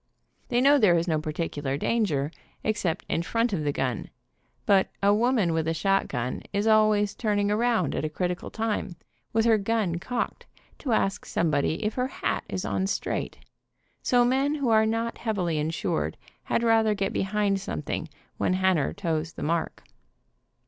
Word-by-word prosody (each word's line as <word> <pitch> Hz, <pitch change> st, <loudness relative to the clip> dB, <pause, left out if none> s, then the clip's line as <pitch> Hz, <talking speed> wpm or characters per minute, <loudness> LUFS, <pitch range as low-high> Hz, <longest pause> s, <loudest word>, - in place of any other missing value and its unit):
They 240 Hz, -, +1 dB
know 285 Hz, +2 st, +6 dB
there 185 Hz, -7 st, +5 dB
is 165 Hz, +2 st, -1 dB
no 155 Hz, -2 st, +1 dB
particular 150 Hz, -3 st, -3 dB
danger, 155 Hz, -8 st, 0 dB, 0.3 s
ex 215 Hz, 0 st, 0 dB
cept 165 Hz, -4 st, -1 dB
in -, -, 0 dB
front 230 Hz, +5 st, 0 dB
of 160 Hz, -5 st, -1 dB
the 145 Hz, -, +1 dB
gun, 130 Hz, -5 st, -2 dB, 0.6 s
but 195 Hz, -2 st, +4 dB, 0.2 s
a 200 Hz, +1 st, +5 dB
woman 220 Hz, -5 st, +2 dB
with 160 Hz, -1 st, 0 dB
a 165 Hz, -, 0 dB
shotgun 160 Hz, -9 st, 0 dB
is 205 Hz, +1 st, 0 dB
always 215 Hz, -2 st, +4 dB
turning 205 Hz, -2 st, 0 dB
around 225 Hz, -, +1 dB
at -, -, -2 dB
a 155 Hz, -, -1 dB
critical 180 Hz, +3 st, -3 dB
time, 215 Hz, -5 st, -2 dB, 0.4 s
with 225 Hz, 0 st, +2 dB
her 225 Hz, -2 st, +4 dB
gun 200 Hz, -5 st, 0 dB
cocked, 245 Hz, +7 st, -3 dB, 0.3 s
to 265 Hz, -, -3 dB
ask 195 Hz, -1 st, +1 dB
somebody 160 Hz, +2 st, 0 dB
if 210 Hz, -, 0 dB
her 250 Hz, 0 st, 0 dB
hat -, -, -2 dB
is 185 Hz, -, -3 dB
on 190 Hz, -, 0 dB
straight, -, -, -2 dB, 0.6 s
so 245 Hz, -1 st, +3 dB
men 270 Hz, +4 st, +2 dB
who 280 Hz, -5 st, 0 dB
are 220 Hz, -1 st, +4 dB
not 230 Hz, +1 st, -2 dB
heavily 180 Hz, -9 st, -1 dB
insured, 160 Hz, +2 st, -1 dB, 0.3 s
had 230 Hz, -, 0 dB
rather 225 Hz, -2 st, +4 dB
get 195 Hz, -1 st, -1 dB
behind 195 Hz, 0 st, 0 dB
something 160 Hz, -2 st, -4 dB, 0.3 s
when -, -, +1 dB
Hanner 185 Hz, -5 st, +2 dB
toes 165 Hz, -4 st, -2 dB
the -, -, -6 dB
mark. 165 Hz, +1 st, -1 dB
200 Hz, 170 wpm, -26 LUFS, 165-225 Hz, 0.6 s, know